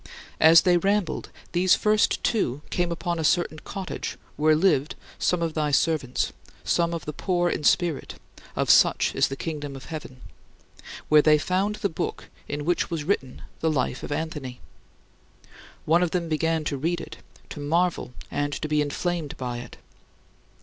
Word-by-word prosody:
As 165 Hz, +1 st, +8 dB
they 180 Hz, -1 st, +4 dB
rambled, 195 Hz, 0 st, 0 dB, 0.2 s
these 180 Hz, +2 st, +4 dB
first 210 Hz, 0 st, +2 dB
two 150 Hz, -, 0 dB
came 175 Hz, -1 st, 0 dB
upon 170 Hz, 0 st, -2 dB
a -, -, -1 dB
certain 155 Hz, -1 st, +1 dB
cottage 195 Hz, +2 st, -5 dB, 0.2 s
where 155 Hz, +1 st, +4 dB
lived 155 Hz, -4 st, +2 dB, 0.2 s
some 175 Hz, -1 st, +1 dB
of 165 Hz, -1 st, -1 dB
thy 150 Hz, -1 st, 0 dB
servants, 145 Hz, -3 st, +1 dB, 0.3 s
some 170 Hz, 0 st, +1 dB
of 165 Hz, -, -6 dB
the 150 Hz, -, -4 dB
"poor 175 Hz, +1 st, 0 dB
in -, -, -3 dB
spirit" 170 Hz, -1 st, +1 dB, 0.4 s
("of -, -, +3 dB
such -, -, +4 dB
is -, -, +3 dB
the 135 Hz, -, -5 dB
Kingdom 145 Hz, -2 st, -5 dB
of 130 Hz, -1 st, -10 dB
Heaven"), 145 Hz, -6 st, -8 dB, 0.9 s
where 150 Hz, 0 st, +6 dB
they 150 Hz, 0 st, +5 dB
found 190 Hz, +7 st, 0 dB
the 210 Hz, -1 st, -1 dB
book 165 Hz, -, -5 dB, 0.2 s
in 145 Hz, 0 st, -4 dB
which 175 Hz, +1 st, +1 dB
was 165 Hz, -3 st, -3 dB
written 145 Hz, -7 st, -2 dB, 0.2 s
the 160 Hz, -, +1 dB
life 130 Hz, -4 st, -1 dB
of -, -, -7 dB
Anthony! 145 Hz, -5 st, -4 dB, 1.3 s
One 165 Hz, +3 st, +4 dB
of 180 Hz, -, +2 dB
them 170 Hz, 0 st, -1 dB
began 160 Hz, 0 st, 0 dB
to 145 Hz, -2 st, -2 dB
read 165 Hz, +5 st, -1 dB
it, -, -, -9 dB, 0.3 s
to -, -, -8 dB
marvel 165 Hz, 0 st, 0 dB, 0.2 s
and 145 Hz, 0 st, -1 dB
to 155 Hz, -, -3 dB
be 150 Hz, 0 st, +2 dB
inflamed 155 Hz, +1 st, -2 dB
by 125 Hz, -2 st, -4 dB
it. 120 Hz, -, -10 dB
160 Hz, 170 wpm, -25 LUFS, 145-175 Hz, 1.3 s, As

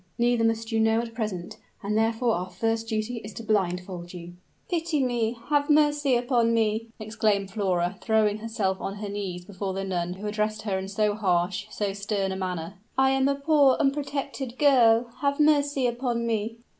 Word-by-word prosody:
"Neither 240 Hz, -1 st, +2 dB
must 225 Hz, 0 st, 0 dB
you 225 Hz, -, +1 dB
know 225 Hz, 0 st, +3 dB
at 230 Hz, -1 st, -4 dB
present; 210 Hz, -6 st, -4 dB, 0.3 s
and 205 Hz, +1 st, -1 dB
therefore 225 Hz, +2 st, +2 dB
our 180 Hz, 0 st, -3 dB
first 225 Hz, +4 st, -1 dB
duty 220 Hz, +2 st, -2 dB
is 210 Hz, -1 st, -8 dB
to 230 Hz, -, -7 dB
blindfold 180 Hz, -4 st, -2 dB
you." 175 Hz, 0 st, -9 dB, 0.3 s
"Pity 330 Hz, -4 st, 0 dB
me 240 Hz, -2 st, 0 dB
have 290 Hz, -1 st, +2 dB
mercy 295 Hz, -3 st, +3 dB
upon 240 Hz, -2 st, +2 dB
me!" 220 Hz, 0 st, +1 dB
exclaimed 215 Hz, -2 st, 0 dB
Flora, 185 Hz, -4 st, -1 dB
throwing 215 Hz, -2 st, +2 dB
herself 215 Hz, -4 st, -2 dB
on 195 Hz, -, -4 dB
her 205 Hz, 0 st, -5 dB
knees 190 Hz, -3 st, -5 dB
before 195 Hz, 0 st, -4 dB
the 195 Hz, -, -2 dB
nun 180 Hz, -2 st, -2 dB
who 195 Hz, +3 st, -9 dB
addressed 215 Hz, 0 st, -1 dB
her 195 Hz, -3 st, -1 dB
in 190 Hz, -, -5 dB
so 210 Hz, +1 st, +1 dB
harsh, 185 Hz, -1 st, 0 dB
so 205 Hz, -2 st, -2 dB
stern 200 Hz, -1 st, -2 dB
a -, -, -3 dB
manner. 185 Hz, 0 st, -4 dB, 0.2 s
"I 265 Hz, 0 st, +4 dB
am 270 Hz, 0 st, +2 dB
a 280 Hz, -, +2 dB
poor, 280 Hz, -2 st, +4 dB
unprotected 275 Hz, -2 st, -2 dB
girl: 245 Hz, -5 st, +5 dB
have 280 Hz, 0 st, 0 dB
mercy 290 Hz, -3 st, +3 dB
upon 240 Hz, -1 st, -1 dB
me!" 225 Hz, 0 st, -2 dB
220 Hz, 180 wpm, -26 LUFS, 195-245 Hz, 0.3 s, girl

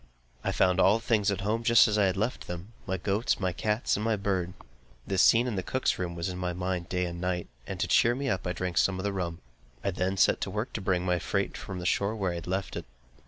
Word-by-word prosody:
I -, -, 0 dB
found 90 Hz, 0 st, +2 dB
all 95 Hz, +3 st, +5 dB
things 115 Hz, -3 st, +1 dB
at 100 Hz, -1 st, -1 dB
home 110 Hz, +3 st, 0 dB
just 115 Hz, +1 st, +6 dB
as 105 Hz, -, 0 dB
I 105 Hz, -2 st, +4 dB
had 95 Hz, -, -1 dB
left 110 Hz, +5 st, -2 dB
them, 90 Hz, +5 st, -7 dB
my 95 Hz, 0 st, -1 dB
goats, 100 Hz, +5 st, 0 dB
my 95 Hz, -3 st, 0 dB
cats, 105 Hz, +6 st, 0 dB
and 105 Hz, -, -2 dB
my 115 Hz, 0 st, +2 dB
bird. 95 Hz, -3 st, -1 dB, 0.5 s
The 95 Hz, -, -1 dB
scene 115 Hz, +5 st, +6 dB
in 120 Hz, -5 st, -2 dB
the -, -, 0 dB
cook's 130 Hz, +8 st, -1 dB
room 85 Hz, -2 st, -3 dB
was 85 Hz, 0 st, -2 dB
in 90 Hz, -1 st, -4 dB
my 90 Hz, -1 st, -2 dB
mind 90 Hz, -1 st, -3 dB
day 90 Hz, 0 st, 0 dB
and 85 Hz, 0 st, -5 dB
night, 90 Hz, -1 st, -1 dB, 0.2 s
and -, -, -5 dB
to -, -, 0 dB
cheer 120 Hz, +1 st, +4 dB
me 140 Hz, +1 st, -3 dB
up 95 Hz, -7 st, -1 dB
I 90 Hz, -, -1 dB
drank 90 Hz, -2 st, -1 dB
some 95 Hz, -1 st, +2 dB
of 95 Hz, -, -4 dB
the 100 Hz, -1 st, -1 dB
rum. 85 Hz, -3 st, -3 dB, 0.4 s
I 100 Hz, -, 0 dB
then 95 Hz, +1 st, -1 dB
set -, -, +4 dB
to -, -, -2 dB
work 105 Hz, +5 st, -3 dB
to 105 Hz, -, -3 dB
bring 90 Hz, -2 st, 0 dB
my 90 Hz, -1 st, +1 dB
freight -, -, -1 dB
from 95 Hz, -, -6 dB
the 90 Hz, -, -5 dB
shore, 100 Hz, +4 st, +1 dB
where 95 Hz, -4 st, -1 dB
I 85 Hz, 0 st, -4 dB
had -, -, -12 dB
left 95 Hz, +1 st, -2 dB
it. -, -, -5 dB
95 Hz, 270 wpm, -29 LUFS, 90-105 Hz, 0.5 s, just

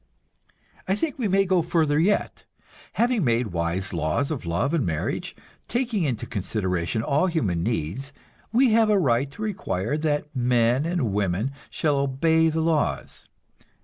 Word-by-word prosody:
I 190 Hz, -, +2 dB
think 290 Hz, +4 st, -3 dB
we 230 Hz, -, +1 dB
may 195 Hz, +1 st, +3 dB
go 185 Hz, -2 st, +3 dB
further 160 Hz, -3 st, +1 dB
yet; 200 Hz, +5 st, 0 dB, 0.5 s
having 235 Hz, -4 st, +1 dB
made 120 Hz, -3 st, +1 dB
wise 85 Hz, +4 st, -2 dB
laws 85 Hz, -, 0 dB
of 130 Hz, -, -4 dB
love 100 Hz, -, 0 dB
and 165 Hz, -6 st, +2 dB
marriage, 80 Hz, -4 st, -3 dB, 0.3 s
taking 240 Hz, -4 st, -1 dB
into 130 Hz, -8 st, -1 dB
consideration 95 Hz, 0 st, -2 dB
all 150 Hz, +4 st, +2 dB
human 105 Hz, -, 0 dB
needs, 115 Hz, -, -2 dB, 0.4 s
we 245 Hz, +2 st, +4 dB
have 220 Hz, 0 st, +4 dB
a 210 Hz, -, +4 dB
right 135 Hz, -5 st, +2 dB
to 210 Hz, +10 st, -8 dB
require 155 Hz, -, -2 dB
that 150 Hz, -1 st, -1 dB
men 125 Hz, +3 st, +2 dB
and 165 Hz, -, -1 dB
women 100 Hz, +5 st, 0 dB, 0.2 s
shall 150 Hz, -3 st, 0 dB
obey 160 Hz, +4 st, +2 dB
the 160 Hz, +1 st, -1 dB
laws. 160 Hz, -2 st, -1 dB
145 Hz, 150 wpm, -24 LUFS, 110-175 Hz, 0.5 s, we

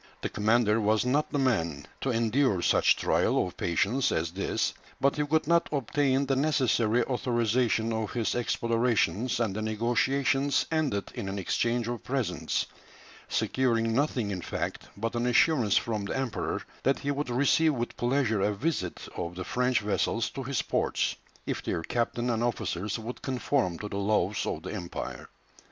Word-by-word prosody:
The -, -, -1 dB
commander 110 Hz, +1 st, +2 dB
was 110 Hz, +2 st, +2 dB
not 145 Hz, +4 st, +1 dB
the -, -, 0 dB
man 85 Hz, -, 0 dB, 0.2 s
to 135 Hz, -, -1 dB
endure 115 Hz, -4 st, +2 dB
such -, -, +4 dB
trial -, -, +2 dB
of -, -, -8 dB
patience 110 Hz, +10 st, +1 dB
as 80 Hz, +1 st, -1 dB
this, 95 Hz, +3 st, -1 dB, 0.3 s
but 140 Hz, 0 st, +2 dB
he 150 Hz, 0 st, 0 dB
could 155 Hz, +1 st, +2 dB
not 170 Hz, +2 st, +3 dB
obtain 140 Hz, 0 st, +1 dB
the 135 Hz, 0 st, +1 dB
necessary 125 Hz, -5 st, +2 dB
authorization 120 Hz, -2 st, +1 dB
of 110 Hz, -1 st, -2 dB
his 115 Hz, -3 st, 0 dB
explorations, 115 Hz, 0 st, +1 dB
and 110 Hz, -5 st, 0 dB
the 110 Hz, -, -2 dB
negotiations 125 Hz, +5 st, +1 dB
ended 145 Hz, -11 st, 0 dB
in 105 Hz, -5 st, -4 dB
an 100 Hz, -, -4 dB
exchange 115 Hz, +5 st, 0 dB
of 120 Hz, -1 st, -4 dB
presents, 130 Hz, -3 st, -1 dB, 0.6 s
securing 115 Hz, -3 st, +1 dB
nothing 125 Hz, -5 st, 0 dB
in 90 Hz, -2 st, -3 dB
fact -, -, -4 dB
but 115 Hz, +2 st, -2 dB
an 120 Hz, +1 st, 0 dB
assurance 125 Hz, -, +4 dB
from 110 Hz, -3 st, -1 dB
the 100 Hz, -, -2 dB
Emperor 130 Hz, -5 st, -2 dB, 0.2 s
that 135 Hz, -, +2 dB
he 140 Hz, -, -2 dB
would 145 Hz, -1 st, -2 dB
receive 145 Hz, +5 st, +3 dB
with 120 Hz, -1 st, -3 dB
pleasure 120 Hz, -4 st, +1 dB
a 105 Hz, +1 st, +1 dB
visit 110 Hz, -, -2 dB
of 85 Hz, 0 st, -4 dB
the 90 Hz, -, -4 dB
French 125 Hz, +3 st, +1 dB
vessels 105 Hz, +2 st, 0 dB
to 135 Hz, -, -5 dB
his 135 Hz, +1 st, -1 dB
ports, -, -, 0 dB, 0.3 s
if -, -, -2 dB
their 80 Hz, -, -2 dB
captain 120 Hz, +4 st, -1 dB
and 115 Hz, 0 st, 0 dB
officers 105 Hz, -4 st, -2 dB
would 115 Hz, +2 st, -7 dB
conform 130 Hz, -8 st, 0 dB
to 105 Hz, -, -5 dB
the 100 Hz, -, -5 dB
laws 100 Hz, 0 st, +1 dB
of -, -, -3 dB
the -, -, -5 dB
Empire. 85 Hz, -, -6 dB
120 Hz, 170 wpm, -28 LUFS, 105-135 Hz, 0.6 s, such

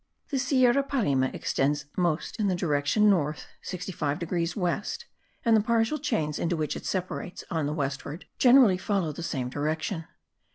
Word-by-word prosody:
The 275 Hz, -, 0 dB
Sierra 255 Hz, 0 st, +4 dB
Parime 210 Hz, -, +1 dB
extends 145 Hz, +2 st, 0 dB
most 175 Hz, +4 st, -1 dB
in 210 Hz, -, +2 dB
the 185 Hz, -, +1 dB
direction 170 Hz, +5 st, +2 dB
north 155 Hz, -7 st, +1 dB, 0.3 s
85 175 Hz, -6 st, -2 dB
degrees 170 Hz, -1 st, -2 dB
west 185 Hz, +1 st, -2 dB, 0.4 s
and 230 Hz, -1 st, +5 dB
the 215 Hz, -, +5 dB
partial 230 Hz, +6 st, +1 dB
chains 155 Hz, -, -1 dB
into 170 Hz, 0 st, 0 dB
which 155 Hz, -2 st, -1 dB
it -, -, -6 dB
separates 185 Hz, +1 st, -3 dB
on 160 Hz, -3 st, 0 dB
the 150 Hz, -, -2 dB
westward 140 Hz, +2 st, -4 dB
generally 245 Hz, -7 st, +6 dB
follow 190 Hz, -6 st, 0 dB
the 150 Hz, -, -7 dB
same 135 Hz, -6 st, -2 dB
direction. 155 Hz, +5 st, -2 dB
175 Hz, 160 wpm, -27 LUFS, 150-215 Hz, 0.4 s, generally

